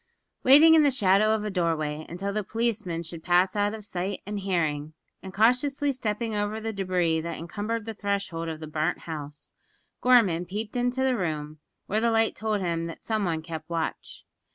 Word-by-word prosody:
Waiting 300 +5 +8
in 320 - +7
the 290 - +5
shadow 210 -4 +3
of 210 -1 -3
a 210 - -2
doorway 155 -4 -1
until 195 +4 -4
the 215 0 -1
policeman 215 -6 -2
should 165 0 -6
pass 180 +2 +3
out 205 +1 +1
of 215 -2 -10
sight 190 0 -3
and 205 0 -4
hearing, 160 -6 -1 0.3
and 190 - -8
cautiously 255 +7 +2
stepping 225 -3 -2
over 205 +1 -1
the 225 0 -4
debris 180 -4 0
that 170 0 -5
encumbered 210 +6 -4
the 225 - -4
threshold 200 -5 -2
of 160 -1 -5
the 155 - -6
burnt 155 +2 -2
house, 150 -3 -8 0.5
Gorman 200 -9 +4
peeped 210 +4 -5
into 245 +1 0
the 260 -1 +2
room, 155 -6 -3 0.3
where 215 +2 0
the 235 - +3
light 225 -1 +2
told 215 -2 -1
him 170 -2 -1
that 165 - -9
some 220 -2 -1
one 160 -2 -2
kept 160 -1 -7
watch. 165 -1 -4
195 Hz, 190 wpm, -26 LUFS, 165-220 Hz, 0.5 s, Waiting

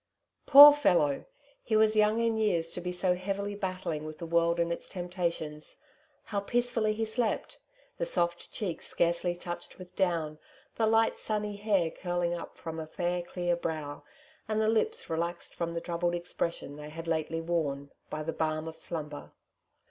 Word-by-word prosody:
Poor 290 +1 +12
fellow! 175 - +2 0.4
he 220 - -1
was 215 0 +4
young 215 +1 +4
in 230 -1 +2
years 175 -7 +1
to 180 - -3
be 180 0 -3
so 180 0 +2
heavily 195 +2 -3
battling 185 -6 -3
with 155 0 -7
the 170 - -6
world 170 +1 +2
and 170 0 +1
its - - -7
temptations. 170 -4 -3 0.5
How 205 -2 -2
peacefully 230 0 +1
he 225 +1 -1
slept! 220 0 -2 0.4
the - - +1
soft 175 - 0
cheek 185 -6 -3
scarcely 170 +1 0
touched 175 0 -7
with 180 -1 -12
down, 165 -5 0 0.3
the 225 - +1
light 225 +1 +3
sunny 210 -1 -2
hair 200 -5 +1
curling 175 -1 -1
up 170 - -7
from 165 0 -6
a 160 - -5
fair, 175 +2 -1
clear 175 0 -1
brow, 155 -4 -4 0.5
and 215 0 0
Ihe 215 - +3
lips 435 - 0
relaxed 170 +1 -3
from 170 -1 -3
the 170 - -2
troubled 175 0 -1
expression 170 -4 -3
they 150 0 -8
had 165 +2 -8
lately 165 0 -1
worn, 150 -4 -2 0.2
by 155 - -4
the 165 +1 -3
balm 155 0 -1
of 160 - -6
slumber 150 -3 -6
175 Hz, 170 wpm, -30 LUFS, 165-205 Hz, 0.5 s, Poor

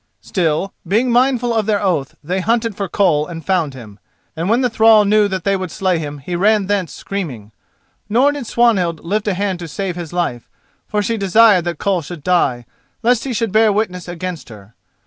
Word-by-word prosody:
Still, 175 +1 -1
being 230 +7 +2
mindful 245 -1 +2
of 220 -2 0
their 210 -2 +2
oath, 175 -9 -1
they 180 +5 -2
hunted 230 +2 0
for 200 -1 -4
Koll 155 -6 +2
and 165 -2 -8
found 170 -8 0
him. 110 -5 -12 0.4
And 165 +4 -2
when 235 +3 +3
the 250 - +2
thrall 220 -1 +5
knew 210 0 +4
that 190 -3 -4
they 195 0 +1
would 185 -2 -4
slay 185 -1 0
him 145 -2 -5
he 175 +6 -5
ran 205 +3 +2
thence 195 -5 -1
screaming. 135 - -6 0.6
Nor 255 +7 +4
did 285 -5 -6
Swanhild 195 -10 +1
lift 210 +4 -1
a 200 - +1
hand 195 -1 -2
to 170 - -6
save 185 +2 -4
his 175 -3 -7
life, 170 -10 -3 0.4
for 210 -1 -1
she 230 +3 -1
desired 200 -2 +4
that 175 -1 -3
Koll 195 -4 0
should 160 0 -9
die, 140 -9 +1 0.4
lest 240 0 +2
he 270 - -3
should 230 -3 -1
bear 220 +1 +4
witness 185 -4 -2
against 175 -2 -6
her. 105 -1 -14
190 Hz, 205 wpm, -18 LUFS, 170-215 Hz, 0.6 s, thrall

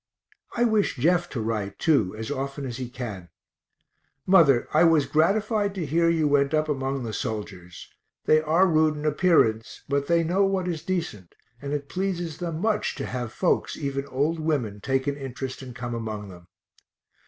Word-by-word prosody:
I 240 - +3
wish 220 -3 +2
Jeff 175 +6 +2
to 130 - -4
write 105 -3 -3
too, 135 - +2
as 110 +4 -5
often 140 0 -4
as 120 -2 -5
he 130 -2 -5
can. 110 -9 -7 1.0
Mother, 160 -10 +5
I 155 - +5
was 165 -4 +4
gratified 200 - +1
to 180 -4 -3
hear 165 +4 +2
you 160 -2 +2
went 140 0 +2
up 155 0 +1
among 135 -2 -2
the 110 -2 -5
soldiers 100 -7 -6 0.4
they 155 0 +5
are 160 +4 +3
rude 155 -3 +3
in 150 +1 -6
appearance, 150 -9 +2
but 140 0 0
they 170 0 +3
know 180 +5 +2
what 195 -2 0
is 165 -3 -3
decent, 165 - -4 0.3
and 140 0 -5
it 145 -1 -3
pleases 175 -4 -3
them 165 -3 -3
much 215 0 0
to - - -4
have 125 -3 -4
folks, 180 - 0
even 140 -1 -3
old 145 +5 -1
women, 135 -10 -1
take 130 +3 0
an 140 - -1
interest 135 -1 -6
and 125 -2 -9
come 120 -1 -5
among 110 -3 -5
them. 90 -1 -13
145 Hz, 180 wpm, -25 LUFS, 120-170 Hz, 1.0 s, Mother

